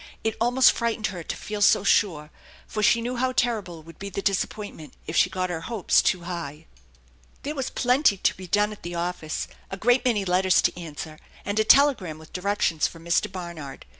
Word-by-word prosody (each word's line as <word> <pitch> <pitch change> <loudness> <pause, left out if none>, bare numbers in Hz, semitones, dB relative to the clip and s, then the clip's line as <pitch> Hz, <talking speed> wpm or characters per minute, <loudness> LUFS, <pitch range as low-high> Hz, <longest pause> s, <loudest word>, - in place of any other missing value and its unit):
It 220 - -1
almost 245 +2 +5
frightened 230 -2 -2
her 175 - -6
to - - -5
feel 210 -1 -5
so 200 - +5
sure, 155 -7 +1 0.3
for 215 - -4
she 230 +3 +4
knew 245 +1 -3
how 255 +1 0
terrible 200 -11 -1
would 165 +1 -15
be 200 - -6
the 200 +1 -5
disappointment 195 -4 -3
if 160 - -5
she - - +4
got 185 -1 -2
her 165 -2 -4
hopes 220 -1 +2
too 185 - +1
high. 165 -3 -6 0.8
There 290 - -3
was 270 -4 -3
plenty 250 -3 +2
to - - +1
be 185 -1 -10
done 205 +3 +2
at 210 - -10
the 175 0 -6
office, 170 -2 -3 0.2
a 195 - -5
great 245 +5 +3
many 225 -6 +1
letters 185 0 +3
to - - +1
answer, 155 -2 -8 0.3
and 205 +2 -1
a - - +4
telegram 230 - +4
with 160 0 -16
directions 180 -4 0
from 165 0 -13
Mr. 170 +2 +1
Barnard. 170 -7 -8
190 Hz, 200 wpm, -25 LUFS, 170-220 Hz, 0.8 s, almost